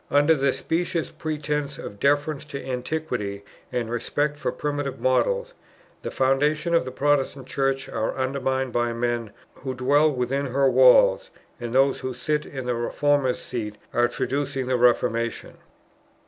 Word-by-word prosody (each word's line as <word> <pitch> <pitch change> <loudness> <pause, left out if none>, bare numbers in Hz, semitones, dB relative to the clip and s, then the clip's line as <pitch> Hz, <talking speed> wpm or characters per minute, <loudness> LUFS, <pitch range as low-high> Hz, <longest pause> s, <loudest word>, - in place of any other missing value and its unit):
Under 145 +3 +5
the 140 -2 +2
specious 170 +2 -2
pretence 150 -2 -3
of 100 - -8
deference 145 +1 +1
to 140 -2 -7
Antiquity 125 -6 -3 0.3
and 120 -2 -1
respect 145 +5 -1
for 145 - -2
primitive 145 -3 -3
models, - - +1 0.5
the - - -4
foundations 150 +5 +1
of 165 - +3
the 130 - -5
Protestant 140 -1 0
Church 135 0 -1
are 110 - -2
undermined 130 -1 -1
by 120 0 +1
men, 120 -2 -2 0.2
who 130 -1 -6
dwell 145 +5 +3
within 135 +2 -1
her 135 +2 +2
walls, - - +5 0.3
and 120 -1 -5
those 135 +1 +4
who 130 -1 -4
sit 150 +4 -1
in 130 -2 -6
the 125 - 0
Reformers' 130 +2 +1
seat 110 -4 -4 0.2
are 120 0 +3
traducing 135 0 -2
the 130 0 0
Reformation." 115 -1 +1
135 Hz, 145 wpm, -24 LUFS, 125-145 Hz, 0.5 s, Under